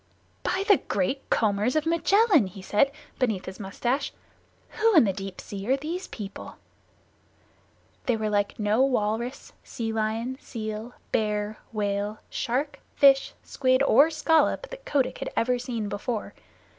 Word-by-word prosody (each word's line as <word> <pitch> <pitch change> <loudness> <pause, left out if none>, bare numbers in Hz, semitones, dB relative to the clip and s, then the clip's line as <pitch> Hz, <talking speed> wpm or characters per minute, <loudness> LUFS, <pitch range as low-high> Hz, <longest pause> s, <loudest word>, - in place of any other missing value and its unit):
"By 380 +1 0
the 405 -4 +7
Great 205 +9 -2
Combers 215 +3 +1
of 310 0 +1
Magellan!" 335 - +4
he 185 +1 -11
said, 240 +8 +2 0.3
beneath 220 -8 0
his 185 - -8
mustache. 240 +8 -2 0.6
"Who 450 -1 +2
in 315 - +8
the 195 -4 +1
Deep 195 -1 -7
Sea 200 +2 -6
are 265 - +4
these 330 +6 -4
people?" 205 -3 -8 1.5
They 245 -3 +2
were 215 -1 -1
like 205 -1 0
no 215 +3 +2
walrus, 240 -1 -1
sea 225 -1 -4
lion, 225 +4 -2
seal, 220 +1 -6 0.2
bear, 210 0 -1
whale, 205 0 -1
shark, 270 +5 -2 0.2
fish, 275 -1 +5
squid, 255 0 +2
or 285 +2 +6
scallop 325 +9 +2
that - - -9
Kotick 260 - 0
had - - -3
ever 250 +1 +2
seen 235 -4 -3
before. 210 +2 -4
235 Hz, 145 wpm, -26 LUFS, 210-275 Hz, 1.5 s, in